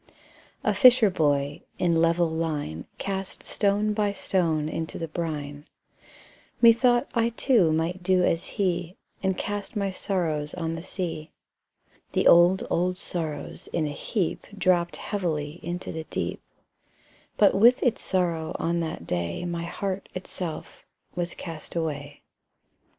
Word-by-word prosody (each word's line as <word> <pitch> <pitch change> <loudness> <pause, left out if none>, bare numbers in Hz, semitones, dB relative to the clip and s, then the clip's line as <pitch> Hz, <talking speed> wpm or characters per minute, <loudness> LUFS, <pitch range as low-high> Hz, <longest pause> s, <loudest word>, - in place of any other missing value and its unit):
A - - +2
fisher 250 -6 +7
boy, 145 -4 +1 0.2
in 170 -2 +2
level 170 +1 +3
line, 150 - -3
Cast 195 -1 -4
stone 205 +1 +1
by 210 -1 +1
stone 165 -6 0
into 160 +1 -4
the 165 - -4
brine: 150 -3 -5 0.9
Methought 240 +2 +5
I 230 -1 +2
too 230 - +3
might 165 +4 -1
do 185 0 +3
as 165 -1 +1
he, 180 -3 -1 0.2
And 190 -2 0
cast 205 +1 -4
my 200 -2 0
sorrows 160 -6 -2
on 165 -2 -2
the 165 - -5
sea. 170 -4 -4 0.8
The - - +1
old, 175 +2 +6
old 180 +1 0
sorrows 160 -6 -5
in 160 - 0
a 150 - -2
heap 180 +4 -2
Dropped 175 -3 +2
heavily 165 -5 -3
into 175 +1 -4
the 160 0 -5
deep; - - -3 1.0
But 205 - +6
with 235 +5 +5
its 245 -3 +1
sorrow 170 -4 -1
on 170 +1 0
that 160 - -4
day 85 - -2
My 170 -1 -3
heart 195 +2 -4
itself 185 -2 -6 0.3
was 175 0 -3
cast 165 -2 -7
away. 145 -3 -4
175 Hz, 135 wpm, -26 LUFS, 160-195 Hz, 1.0 s, fisher